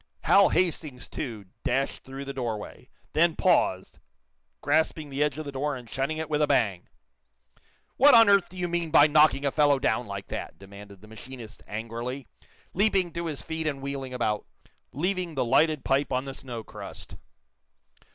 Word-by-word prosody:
Hal 200 -1 +5
Hastings, 155 -7 -1
too, 115 -8 -6 0.2
dashed 135 +1 -1
through 135 +1 -8
the 140 - -5
door 120 -5 -2
way; 105 - -11 0.2
then 165 0 +3
paused, 95 - +1 0.6
grasping 155 0 0
the 135 +2 -3
edge 150 -1 +1
of 155 - -5
the 140 - -5
door 140 +2 -2
and 125 -2 -10
shutting 135 +6 -2
it 160 0 -3
with 150 0 0
a 150 - +3
bang. 110 -10 +1 1.1
"What 285 0 +7
on 230 -1 +8
earth 200 -2 +4
do 185 - -12
you 180 -1 -1
mean 170 -1 -1
by 150 -2 +7
knocking 150 -2 +4
a 140 - +1
fellow 145 -1 +4
down 125 -2 0
like 100 -1 -7
that?" - - -6
demanded 100 0 -13
the 105 - -14
machinist, 115 +1 -10
angrily, 115 +5 -5 0.5
leaping 195 -3 +1
to 170 0 -3
his 150 -3 -4
feet 160 -1 -3
and 140 -3 -2
wheeling 135 -1 -5
about, 110 -4 -2 0.4
leaving 175 +3 -2
the 130 - 0
lighted 155 +4 +2
pipe 135 +1 +1
on 130 +1 -1
the 135 - -6
snowcrust. 120 -5 -8
140 Hz, 175 wpm, -27 LUFS, 120-160 Hz, 1.1 s, on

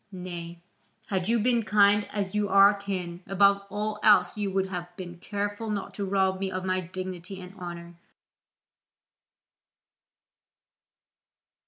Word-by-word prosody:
Nay, 175 -2 -7 0.5
had 190 -2 -1
you 235 - +4
been 235 +1 +2
kind 205 -1 +4
as 200 -2 -3
you 210 -1 0
are 195 +1 +7
kin, 185 -4 -5
above 200 +1 +4
all 210 +1 -3
else 195 -4 +5
you 205 -2 -2
would 190 0 -1
have 175 -2 -5
been 175 -2 -8
careful 205 +3 -3
not 205 -2 -3
to 200 - -3
rob 190 -1 +1
me 195 0 -1
of 185 0 -4
my 185 0 +1
dignity 185 +1 -7
and 180 0 -10
honour. 175 -2 -8
195 Hz, 135 wpm, -27 LUFS, 180-205 Hz, 0.5 s, are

